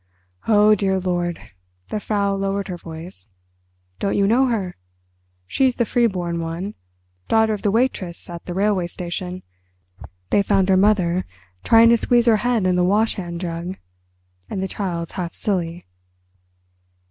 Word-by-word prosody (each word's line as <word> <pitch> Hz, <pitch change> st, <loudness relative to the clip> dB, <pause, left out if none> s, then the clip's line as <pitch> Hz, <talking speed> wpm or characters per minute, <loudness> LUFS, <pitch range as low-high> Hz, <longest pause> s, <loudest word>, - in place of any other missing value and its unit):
"Oh, 210 Hz, -1 st, +6 dB
dear 190 Hz, -2 st, +1 dB
Lord"—the 175 Hz, -, -5 dB
Frau 200 Hz, -1 st, 0 dB
lowered 195 Hz, 0 st, -2 dB
her 180 Hz, -, -4 dB
voice—"don't 90 Hz, -, -8 dB
you 200 Hz, -, +3 dB
know 245 Hz, +6 st, +4 dB
her? 205 Hz, -7 st, -2 dB, 0.7 s
She's 255 Hz, -, +1 dB
the 235 Hz, -, +1 dB
free 240 Hz, +1 st, +2 dB
born 175 Hz, -4 st, -3 dB
one—daughter 165 Hz, -, -2 dB
of 205 Hz, -, -4 dB
the 205 Hz, -, +1 dB
waitress 205 Hz, -6 st, -1 dB
at 170 Hz, -1 st, -8 dB
the 175 Hz, -, -5 dB
railway 195 Hz, -2 st, +1 dB
station. 180 Hz, +1 st, -5 dB, 0.9 s
They 205 Hz, -, +4 dB
found 195 Hz, -1 st, +2 dB
her 190 Hz, -, +5 dB
mother 185 Hz, -3 st, +3 dB, 0.4 s
trying 230 Hz, 0 st, +6 dB
to 235 Hz, -, +5 dB
squeeze 240 Hz, +1 st, +3 dB
her 225 Hz, -2 st, +5 dB
head 235 Hz, -3 st, 0 dB
in 180 Hz, -1 st, +2 dB
the 180 Hz, -, +3 dB
wash 210 Hz, +5 st, +3 dB
hand 175 Hz, -3 st, -6 dB
jug, 175 Hz, +1 st, -4 dB, 0.7 s
and 190 Hz, -, -3 dB
the -, -, -1 dB
child's 175 Hz, -4 st, -4 dB
half 175 Hz, -3 st, -5 dB
silly." 175 Hz, -4 st, -2 dB
185 Hz, 145 wpm, -21 LUFS, 170-210 Hz, 0.9 s, Oh